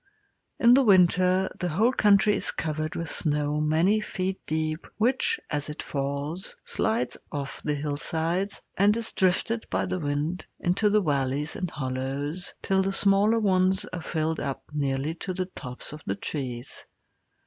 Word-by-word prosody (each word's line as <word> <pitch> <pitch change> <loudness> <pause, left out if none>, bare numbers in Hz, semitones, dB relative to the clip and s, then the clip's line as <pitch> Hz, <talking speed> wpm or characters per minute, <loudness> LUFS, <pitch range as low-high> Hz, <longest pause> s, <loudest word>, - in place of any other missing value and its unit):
In 235 +1 +7
the 270 - +7
winter 185 -2 +4
the 180 - -1
whole 220 +10 +2
country 210 -2 +4
is - - 0
covered 155 0 -3
with 165 - -3
snow 150 -1 +1
many 165 +8 +3
feet 190 -2 -3
deep, 155 +1 -2
which, 260 - +2
as 150 0 -3
it 150 - -5
falls, 140 +5 -3
slides 225 +2 -1
off 140 -2 -5
the 150 - -1
hillsides, 160 +6 -2
and 205 +3 +4
is 230 -1 -4
drifted 195 +5 +1
by - - 0
the 185 - -2
wind 150 +4 -2 0.2
into 190 +4 +2
the 210 +1 +4
valleys 140 0 0
and 185 -4 -3
hollows 140 +5 -3
till 190 0 +2
the 195 +1 0
smaller 200 +3 +4
ones 190 -1 +2
are 180 - -3
filled 160 -1 -1
up 140 -1 -3
nearly 140 +1 -1
to 185 +2 -5
the 185 0 -1
tops 125 -7 -8
of 150 - -9
the 100 - 0
trees. 125 +2 -5
170 Hz, 160 wpm, -27 LUFS, 145-195 Hz, 0.2 s, In